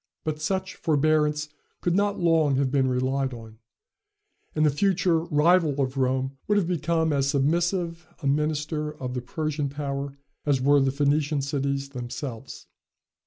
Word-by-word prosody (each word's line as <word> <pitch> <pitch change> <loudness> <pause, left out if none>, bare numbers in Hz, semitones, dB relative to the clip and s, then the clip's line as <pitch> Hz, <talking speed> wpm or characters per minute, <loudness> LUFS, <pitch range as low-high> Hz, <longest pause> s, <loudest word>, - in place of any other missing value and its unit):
But 155 -1 -3
such 190 +3 -1
forbearance 150 0 +2 0.3
could 175 - 0
not 205 0 +1
long 165 -5 +3
have 135 -1 +1
been 135 -2 +2
relied 130 +1 0
on, 110 -1 -12 1.0
and 155 0 +3
the 150 - +4
future 180 +1 +2
rival 160 -2 +3
of 130 -1 0
Rome 130 0 0
would 205 0 +3
have 190 -5 +1
become 165 -2 +1
as 140 -1 +1
submissive 170 +4 0
a 150 - -8
minister 150 +1 0
of 125 -3 -5
the 125 - -3
Persian 150 +2 -2
power 140 -1 -4 0.3
as 145 -3 +2
were 140 +2 +4
the 135 -1 +2
Phoenician 145 +1 +1
cities 140 0 -2
themselves. 125 -2 -7
145 Hz, 150 wpm, -26 LUFS, 135-160 Hz, 1.0 s, the